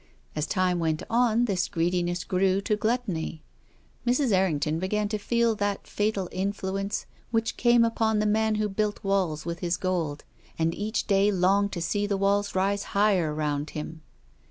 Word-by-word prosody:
As 150 0 -1
time 185 -2 +1
went 160 -2 -1
on 235 0 +3
this 190 -4 0
greedi 175 0 0
ness 175 0 -2
grew 190 +1 +1
to 210 - 0
gluttony. 210 -8 -2 0.6
Mrs. 250 +1 +2
Errington 160 -5 +1
began 210 +3 0
to 215 0 -2
feel 235 +2 +2
that 205 -1 -2
fatal 205 -3 -1
influence 195 +1 -2 0.2
which 225 -1 0
came 240 -1 +4
upon 225 -1 +1
the 210 - +1
man 220 +1 +2
who 210 0 0
built 210 +1 -2
walls 185 -6 0
with 170 0 -4
his 175 -1 -1
gold, 170 -6 -2 0.3
and 165 0 +1
each 215 +5 -2
day 200 0 +3
longed 195 +2 +2
to 170 - -3
see 205 +4 0
the 200 -1 0
walls 200 +1 +1
rise 195 +2 +1 0.2
higher 195 -6 +3
round 150 -1 -2
him. 155 +1 -6
195 Hz, 170 wpm, -27 LUFS, 175-210 Hz, 0.6 s, came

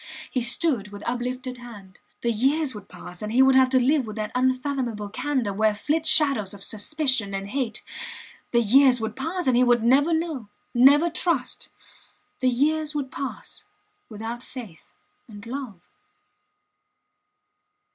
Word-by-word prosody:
He 255 - 0
stood 240 - +2
with 205 0 -10
uplifted 250 +1 -3
hand... 205 -6 -12 0.2
The 235 - +1
years 270 +5 +1
would 205 -2 -11
pass 180 0 -9
and 210 0 -4
he 255 +3 +5
would 265 0 +5
have 260 0 +5
to 260 0 +4
live 265 0 +2
with 215 - -6
that 215 -1 -4
unfathomable 255 -4 -1
candour 250 -2 -1
where 215 +1 +2
flit 310 +8 -1
shadows 275 -11 +3
of 195 - -10
suspicions 230 -2 -1
and 195 +1 -5
hate... 240 -3 -3 0.7
The 235 - +3
years 250 +3 +5
would 220 -1 -4
pass 335 +6 -3
and 255 - +3
he 250 - +5
would 240 -2 +3
never 275 +7 +4
know 320 -9 -2 0.2
never 285 +7 +6
trust... 340 0 -1 0.7
The 255 - +3
years 300 +4 0
would 275 -3 -3
pass 275 - -6 0.4
without 225 +2 -6
faith 230 - -11 0.4
and 205 -2 -11
love. 245 -6 -6
250 Hz, 150 wpm, -25 LUFS, 220-280 Hz, 0.7 s, never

